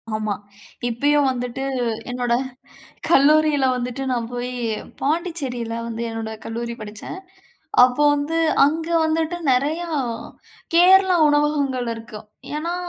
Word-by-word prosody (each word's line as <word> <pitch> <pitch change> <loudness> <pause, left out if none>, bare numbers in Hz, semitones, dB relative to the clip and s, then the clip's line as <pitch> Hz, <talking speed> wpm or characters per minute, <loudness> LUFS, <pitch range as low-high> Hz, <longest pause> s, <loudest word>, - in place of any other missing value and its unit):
ஆமா. 215 -1 -1 0.5
இப்பயும் 285 +4 +2
வந்துட்டு 250 +1 -4 0.5
என்னோட 245 -1 -1 0.8
கல்லூரியில 300 -1 +4
வந்துட்டு, 250 +2 -4
நான் 235 -1 -2
போயி 245 +1 -4 0.5
பாண்டிச்சேரியில 275 -7 -2
வந்து 230 0 -4
என்னோட 225 -1 -5
கல்லூரி 235 +1 -4
படிச்சேன். 215 - -8 0.7
அப்போ 255 +4 +1
வந்து 295 +3 -1 0.3
அங்க 320 +3 -2 0.2
வந்துட்டு 320 +2 0 0.2
நெறையா 310 +7 0 0.9
கேரளா 370 +1 +6
உணவகங்கள் 290 -4 +1
இருக்கு. 225 -2 -9 0.4
ஏன்னா 335 +3 -2
270 Hz, 100 wpm, -22 LUFS, 235-310 Hz, 0.9 s, கேரளா